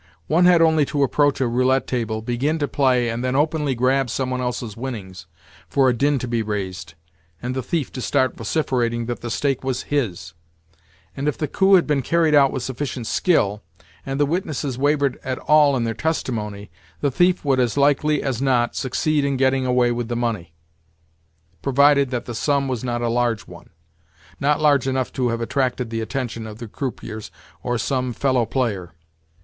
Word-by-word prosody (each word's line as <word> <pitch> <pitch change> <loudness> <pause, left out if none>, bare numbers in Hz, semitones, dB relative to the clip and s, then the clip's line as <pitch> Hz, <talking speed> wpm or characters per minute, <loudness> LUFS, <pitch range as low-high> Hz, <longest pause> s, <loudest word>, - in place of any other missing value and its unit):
One 170 - +3
had 175 -2 +6
only 160 -2 +4
to 140 0 0
approach 145 +1 +2
a 130 - +2
roulette 130 +3 +2
table, 110 -3 -2
begin 130 +7 -1
to 145 -2 -1
play, 130 -4 +2
and 115 +1 -3
then 130 0 -1
openly 150 -1 +1
grab 130 +2 +1
some 130 +3 -2
one 125 0 -2
else's 125 -3 -3
winnings, 100 -10 -7 0.4
for 135 -2 +3
a - - +2
din 140 +4 +1
to 125 - -4
be 115 -1 0
raised, 95 -6 -4 0.4
and 125 +1 -4
the 130 - -1
thief 150 +1 -2
to 130 - -6
start 130 -1 +1
vociferating 120 -2 -1
that 120 0 -4
the 120 - -5
stake 135 +2 -1
was 130 -1 -2
his; 90 - -2 0.8
and, 140 +2 -3
if 150 - 0
the 150 - -2
coup 190 +6 +4
had 180 - +4
been 145 -3 +1
carried 165 +3 +2
out 140 -2 +5
with 130 - -4
sufficient 130 -2 -4
skill, 105 - +1 0.4
and 135 +6 -4
the 145 - +4
witnesses 150 -4 -2
wavered 140 0 +1
at 130 -1 -3
all 150 -3 +4
in 120 - -1
their 115 -1 -1
testimony, 110 - -3 0.3
the 140 - +1
thief 180 +4 +2
would 135 -2 +2
as 125 0 +1
likely 145 +1 +2
as 130 -3 -2
not 125 -3 +1
succeed 145 +3 0
in 140 -1 0
getting 130 0 +2
away 125 -1 +3
with 120 -1 -2
the 120 - -3
money, 115 -9 -2 1.1
provided 140 0 +4
that 125 -2 -3
the 120 - -6
sum 140 +3 0
was 125 -3 -3
not 120 -1 -2
a - - +1
large 120 -2 0
one—not 80 - -6
large 145 -4 +3
enough 130 -1 -1
to 125 -2 0
have 115 0 -2
attracted 125 -1 -1
the 115 0 -2
attention 115 -2 -4
of 105 -1 -9
the 115 0 -8
croupiers 110 -3 -6 0.3
or 120 0 -1
some 130 0 -1
fellow 130 -3 +1
player. 105 -11 -2
130 Hz, 190 wpm, -22 LUFS, 115-140 Hz, 1.1 s, had